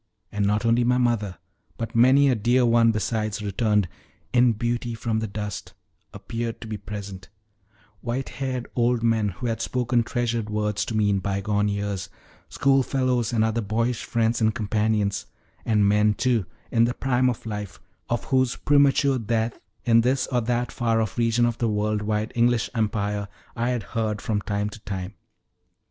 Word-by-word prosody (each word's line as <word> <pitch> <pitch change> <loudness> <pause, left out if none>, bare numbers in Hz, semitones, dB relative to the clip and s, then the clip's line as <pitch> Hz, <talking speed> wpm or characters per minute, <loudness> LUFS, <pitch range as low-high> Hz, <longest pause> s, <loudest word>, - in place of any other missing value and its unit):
And 100 -1 0
not 105 +3 +1
only 115 +1 +3
my 125 +1 +3
mother, 115 -7 0 0.4
but 115 0 -4
many 130 +4 +6
a 130 - +4
dear 120 +3 +2
one 115 -1 +4
besides 110 -1 -1
returned 105 -1 +1 0.5
"in 125 -1 +5
beauty 120 +1 -2
from 115 -1 -1
the 110 - -2
dust" 105 0 -6 0.4
appeared 115 0 -5
to - - -7
be 110 - -4
present 100 -2 -8 0.7
white 125 +4 -3
haired 130 -2 -3
old 120 -1 +2
men 110 -3 +2
who 100 +6 -7
had 115 -1 -1
spoken 120 +2 +1
treasured 115 -2 -2
words 105 -1 -1
to 110 - -2
me 105 -1 +3
in 100 - +1
bygone 100 +2 0
years; 100 -1 -2 0.4
schoolfellows 130 -3 +1
and 115 -2 +2
other 110 +1 0
boyish 115 +3 -1
friends 115 0 0
and 110 0 +2
companions; 105 -2 0 0.4
and 105 -3 +3
men, 105 +1 +3
too, 120 -7 +1 0.2
in 115 0 +4
the 120 - -1
prime 130 -1 +2
of 120 - -5
life, 105 -3 -5 0.3
of 120 0 -1
whose 130 -2 +1
premature 140 -2 +3
death 115 0 -1 0.3
in 115 -1 +5
this 130 +2 +1
or 125 -1 +2
that 120 +1 -1
far 115 -2 +1
off 110 - -1
region 115 +1 +3
of 120 -1 -1
the 115 - +1
world 105 0 0
wide 105 +1 -1
English 120 -1 +2
empire 105 -2 -1 0.3
I 120 0 0
had 125 -3 -1
heard 110 +1 -2
from 105 -3 -1
time 105 0 -2
to 110 - -10
time. 95 -1 -5
115 Hz, 170 wpm, -24 LUFS, 105-120 Hz, 0.7 s, many